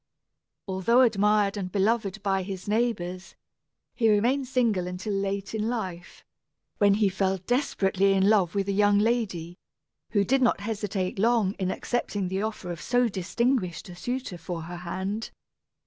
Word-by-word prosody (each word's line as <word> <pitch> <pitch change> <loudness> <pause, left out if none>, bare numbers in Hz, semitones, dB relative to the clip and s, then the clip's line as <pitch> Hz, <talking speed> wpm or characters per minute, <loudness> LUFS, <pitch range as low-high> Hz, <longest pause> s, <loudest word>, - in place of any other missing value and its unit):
Although 195 +6 +3
admired 210 -3 +3
and 185 -2 -4
beloved 205 0 0
by 195 -2 +1
his 190 0 -6
neighbors, 205 -5 -1 0.6
he 225 -3 +2
remained 245 +6 +2
single 230 -8 +1
until 180 +3 -4
late 195 +1 -2
in 220 0 -1
life, 185 -7 -5 0.5
when 200 -1 +5
he 210 -1 +3
fell 190 0 0
desperately 195 -3 +1
in 195 0 +3
love 200 -4 +3
with 200 -1 0
a - - +1
young 205 0 +4
lady, 205 -6 -1 0.5
who 205 -3 +2
did 270 +4 +2
not 240 -5 +2
hesitate 200 -3 -3
long 220 -3 +3
in 185 -1 0
accepting 205 -3 -2
the 190 +1 -1
offer 210 -4 -4
of 170 - -6
so 245 0 +2
distinguished 195 0 -1
a 175 - -9
suitor 245 -2 -4
for 165 0 -5
her 175 +2 -7
hand. 190 +5 -4
200 Hz, 155 wpm, -27 LUFS, 185-225 Hz, 0.6 s, when